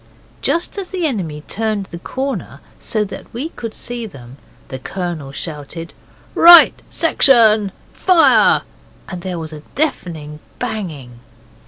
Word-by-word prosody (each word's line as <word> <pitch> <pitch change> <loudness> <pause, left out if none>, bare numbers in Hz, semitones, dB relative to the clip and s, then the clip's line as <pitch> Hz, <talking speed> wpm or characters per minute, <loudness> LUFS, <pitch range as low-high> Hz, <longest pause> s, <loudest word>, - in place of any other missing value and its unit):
Just 340 +4 -1
as 380 - -5
the 365 -3 -2
enemy 175 - -3
turned 215 -2 -2
the 170 -2 -9
corner 230 - -4 0.2
so 215 -2 -1
that 200 - -10
we 265 +8 -4
could 230 -8 -7
see 240 -2 -5
them, 130 - -13 0.3
the 130 - -6
Colonel 170 -2 -5
shouted 160 +2 -7 0.4
'Right 340 -1 +8
section, 225 - +4 0.2
fire!' 360 -3 +4 0.5
and 180 -2 -6
there 180 -1 -4
was 160 -1 -6
a 155 - -8 0.2
deafening 160 - -3 0.2
banging. 155 - -5
195 Hz, 130 wpm, -18 LUFS, 155-245 Hz, 0.5 s, Right